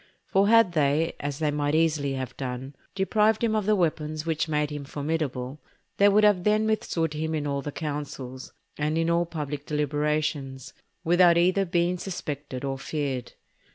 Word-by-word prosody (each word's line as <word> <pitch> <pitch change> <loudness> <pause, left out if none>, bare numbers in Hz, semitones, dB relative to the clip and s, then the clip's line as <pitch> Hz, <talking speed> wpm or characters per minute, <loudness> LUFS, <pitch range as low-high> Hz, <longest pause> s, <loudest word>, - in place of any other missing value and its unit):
For 195 +1 +2
had 230 -3 +5
they, 155 +1 +1
as 145 -1 -3
they 155 -1 0
might 145 0 0
easily 155 -4 +1
have 130 -1 -5
done, 130 +1 -5 0.2
deprived 210 +3 +2
him 220 -2 +2
of 210 -2 -1
the 215 - +4
weapons 155 -3 -1
which 160 0 0
made 150 -1 0
him 145 -1 -5
formidable, 145 -2 -3 0.4
they 200 +1 +6
could 210 +1 +4 0.2
then 210 +1 +3
have 220 - 0
withstood 165 -7 -1
him 160 +1 -2
in 150 -1 -2
all 140 -1 -1
the 145 - -5
councils, 140 -4 -6 0.3
and 150 +2 0
in 165 0 +1
all 170 0 +2
public 150 -3 -5
deliberations, 150 -2 -1 0.3
without 175 0 +5
either 185 +3 +3
being 175 0 0
suspected 145 -8 -5
or 135 -1 -3
feared. 135 -3 -3
155 Hz, 170 wpm, -26 LUFS, 145-175 Hz, 0.4 s, they